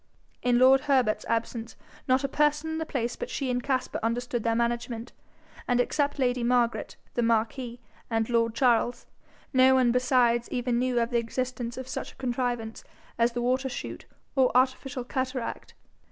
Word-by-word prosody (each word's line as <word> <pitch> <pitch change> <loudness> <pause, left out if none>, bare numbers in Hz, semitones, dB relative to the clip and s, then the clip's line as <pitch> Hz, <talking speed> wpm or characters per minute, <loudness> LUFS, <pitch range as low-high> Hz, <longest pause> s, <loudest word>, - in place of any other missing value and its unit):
In 245 -1 +3
lord 260 +2 +6
Herbert's 255 -6 +2
absence 230 0 -2 0.3
not 260 +2 +3
a - - +1
person 300 +2 +1
in 320 - -2
the 320 - -3
place 240 -5 -2
but 485 - -6
she 270 -3 -2
and 245 0 0
Caspar 260 -1 -1
understood 240 +1 -1
their 230 -1 +1
management, 235 0 -2 0.5
and 245 0 +2
except 285 +4 +1
lady 250 -2 +1
Margaret, 240 -1 +1 0.2
the 240 - 0
marquis, 230 +2 0 0.3
and 225 -1 0
lord 230 -1 +1
Charles, 240 -1 +2 0.5
no 260 0 +6
one 255 -2 +4
besides 245 -1 +2
even 245 -1 0
knew 250 -1 +1
of 235 +1 0
the 240 - +3
existence 245 0 -3
of 260 -1 -6
such - - -5
a - - -26
contrivance 240 -3 -3 0.4
as 235 +1 +3
the 240 0 -2
water 260 +2 +1
shoot 250 - -6 0.3
or 260 -2 +4
artificial 260 0 0
cataract. 255 -1 -4
245 Hz, 170 wpm, -27 LUFS, 235-260 Hz, 0.5 s, lord